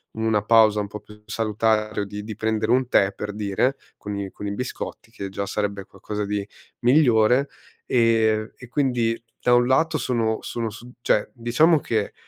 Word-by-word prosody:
una 110 -2 +1
pausa 110 -1 +5
un 105 - -1
po' 105 +1 -8
più 105 0 -17
salutare 110 -1 0
o - - -1
di 105 +1 -7
di 110 0 -7
prendere 110 +1 0
un 130 0 +3
tè, 100 -4 +3
per 105 -1 -5
dire, 105 +6 0 0.2
con 105 0 -6
i 100 -1 -4
con 105 - -8
i 100 - -2
biscotti 125 -2 -6
che 100 -4 -6
già 100 +1 -4
sarebbe 100 -1 -2
qualcosa 105 +2 -5
di 100 0 -3 0.3
migliore, 125 0 +4 0.4
ehm, 110 -2 +2
e 125 - -12
quindi 120 -4 0 0.2
da 125 - +4
un 120 - +4
lato 160 +4 +2
sono 115 -5 0
sono 115 -1 -3
su 120 +3 -11
cioè, 105 - +1
diciamo 140 +7 +3
che 110 -5 -2
110 Hz, 180 wpm, -23 LUFS, 105-120 Hz, 0.4 s, pausa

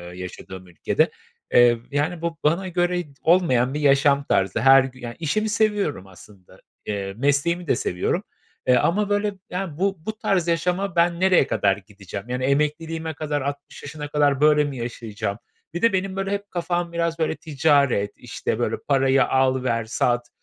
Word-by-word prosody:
yaşadığım 90 0 -9
ülkede. 90 - 0 0.4
Eee, 120 -1 +6
yani 150 +4 -1
bu 170 -1 -3
bana 170 +5 +1
göre 175 0 0
t 150 - -18
olmayan 135 -8 +3
bir 150 - -2
yaşam 140 0 +3
tarzı. 95 -6 0
Her 135 +3 +7
gü 130 -1 -8
yani 120 -1 -7
işimi 215 +8 -1
seviyorum 205 - 0
aslında, 95 0 -17 0.3
eee, 100 -2 -3
mesleğimi 145 +6 0
de - - +3
seviyorum, 90 -5 -1 0.4
eee, 125 - +6
ama 195 - +1
böyle, 205 0 0 0.2
yani, 180 -4 -4
bu 195 +2 +1
bu 220 0 -4
tarz 180 -6 0
yaşama 180 +3 0
ben 170 0 +2
nereye 185 -6 +4
kadar 100 -6 +1
gideceğim? 100 +1 -10
Yani 125 +1 -2
emekliliğime 160 +4 -1
kadar, 150 -1 -3
60 140 +1 -6
yaşına 145 +1 -6
kadar 145 -2 +1
böyle 150 0 +5
mi 145 -2 -4
yaşayacağım? 110 -4 -4 0.4
Bir 175 - -4
de, 230 -2 +3
benim, 190 0 -1
böyle, 195 0 -2
hep 200 0 -4
kafam 175 -1 -2
biraz 170 0 -1
böyle 160 0 0
ticaret, 140 -9 +1
işte, - - -4
böyle - - 0
parayı 135 -1 +3
al, 130 -1 +1
ver, 115 -3 0
sat... 120 +2 0
145 Hz, 170 wpm, -23 LUFS, 125-175 Hz, 0.4 s, Her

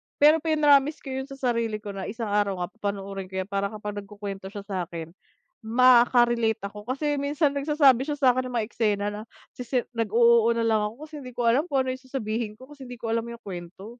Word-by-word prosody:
Pero 305 +2 +6
pinromise 300 -2 +3
ko 270 - -6
yun 265 +1 -4
sa 275 - -9
sarili 230 -5 -1
ko 205 - -5
na 195 -1 -6
isang 225 -1 -4
araw 205 -2 +1
nga - - -6
papanoorin 200 -2 -5
ko 190 - -11
yan, 200 - -20
para 200 0 0
kapag 210 0 -6
nagkukwento 200 -1 -7
siya 200 0 -8
sa 185 -4 -3
akin, 165 -2 -7 0.5
maka-relate 240 -1 +4
ako 210 +1 -10
kasi 290 +3 -1
minsan 285 0 0
nagsasabi 280 -3 +4
siya 295 0 -3
sa 255 -3 +4
akin 255 -1 -2
ng - - -9
mga 220 -2 0
eksena 205 -4 0
na 210 +1 -6 0.3
sisi 250 0 -1 0.2
nag-o-oo 230 +1 +4
na 230 - -1
lang 220 -2 +2
ako 295 +7 -11
kasi 310 - -27
hindi 250 - -8
ko 240 -1 -1
alam 255 +6 +4
kung 265 -1 +2
ano 255 - -1
yung 260 - -16
sasabihin 225 -4 -3
ko 260 - -13
kasi 280 -2 -11
hindi 245 -1 -9
ko 230 - -5
alam 230 0 0
yung 235 0 -8
kwento. 180 0 -8
235 Hz, 225 wpm, -26 LUFS, 205-265 Hz, 0.5 s, Pero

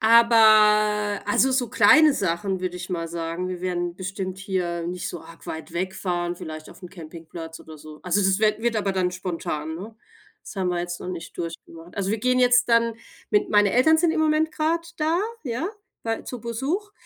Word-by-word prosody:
aber 215 -2 +5
also, 260 +5 +3
so 255 -2 +1
kleine 310 -1 +6
Sachen, 190 +1 -1
würde 180 -1 -3
ich 180 +1 -7
mal 165 -2 -3
sagen, 170 +2 -4
wir 180 -1 -5
werden 175 -1 -2
bestimmt 185 0 -5
hier 180 -3 -2
nicht 180 0 -4
so 175 - -7
arg 165 - -15
weit 160 0 -7
wegfahren, 175 -1 -2
vielleicht 155 -2 -8
auf - - -15
dem 180 -2 -10
Campingplatz 165 -1 -9
oder 155 -1 -12
so. 155 0 -12
Also, 185 +3 +2
das 190 0 +2
wird 215 0 +2
wird 235 -2 +1
aber 200 -2 0
dann 185 -1 0
spontan, 165 -4 -4
ne? 215 +5 -9 0.5
Das - - -10
haben 185 -1 0
wir 175 - -1
jetzt 175 0 -5
noch - - -6
nicht 175 -3 -7
durchgedacht. 165 0 -8
Also, 195 -1 -1
wir 225 - -1
gehen 255 +3 +2
jetzt 245 -1 +4
dann 230 -1 +3 0.4
mit 210 - +2
Meine 205 -1 +4
Eltern 315 +6 +5
sind 330 -1 +3
im 320 - 0
Moment 310 0 +2
grad 335 +2 -1
da, 320 +4 +1 0.2
ja, 255 +6 -2 0.4
weil 225 0 -2
zu 250 -3 -7
Besuch 280 - -3
190 Hz, 195 wpm, -24 LUFS, 175-230 Hz, 0.5 s, kleine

